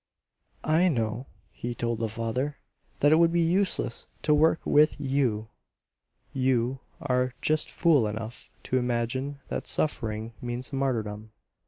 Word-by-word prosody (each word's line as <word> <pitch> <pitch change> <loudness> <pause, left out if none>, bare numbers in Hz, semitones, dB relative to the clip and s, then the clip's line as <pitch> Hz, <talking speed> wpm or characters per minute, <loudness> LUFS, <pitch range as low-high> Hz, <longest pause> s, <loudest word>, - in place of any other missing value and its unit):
"I 160 +4 +4
know," 115 -4 -1 0.2
he 120 0 -5
told 115 -1 -2
the 115 -1 -1
father, 115 +6 -2 0.4
"that 145 - +5
it 155 - +6
would 165 0 +5
be 170 - +2
useless 175 -7 +1 0.2
to 150 - +4
work 160 +2 +4
with 150 +1 +4
YOU. 130 -6 0 0.8
You 130 0 +1 0.2
are 125 -2 0
just 155 0 +1
fool 150 -10 +3
enough 110 +2 -6
to 130 - +1
imagine 125 +3 -2
that - - -3
suffering 110 -6 -1
means 120 +2 -5
martyrdom. 110 -5 -2
130 Hz, 135 wpm, -27 LUFS, 115-145 Hz, 0.8 s, it